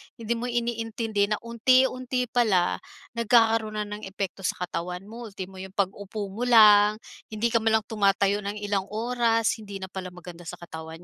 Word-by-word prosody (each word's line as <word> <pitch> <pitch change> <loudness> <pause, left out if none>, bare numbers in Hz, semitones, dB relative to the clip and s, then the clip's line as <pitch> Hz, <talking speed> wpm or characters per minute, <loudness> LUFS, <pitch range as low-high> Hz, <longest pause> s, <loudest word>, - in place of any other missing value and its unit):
Hindi 230 -1 -2
mo 240 - -4
iniintindi 225 -3 -1
na 210 - +1
unti-unti 255 +2 +2
pala 205 -8 +2 0.4
nagkakaroon 225 -1 +3
na 210 - -1
ng 210 0 -7
epekto 195 -1 -5
sa - - 0
katawan 180 +1 -4
mo. 230 +3 -9
Ultimo 190 -2 -8
'yong 190 0 -8
pag-upo 200 +1 -3
mo 235 +5 -3
lang, 210 -3 +7 0.3
hindi 220 +2 -1
ka 230 - +4
man 220 0 +1
lang - - -31
tumatayo 200 -1 +2
ng 205 +1 -3
ilang 200 -2 -1
oras, 230 0 +1
hindi 200 -2 -9
na 190 - -6
pala 185 -1 -5
maganda 175 -1 -11
sa 180 - -5
katawan 160 0 -9
210 Hz, 175 wpm, -26 LUFS, 195-230 Hz, 0.4 s, lang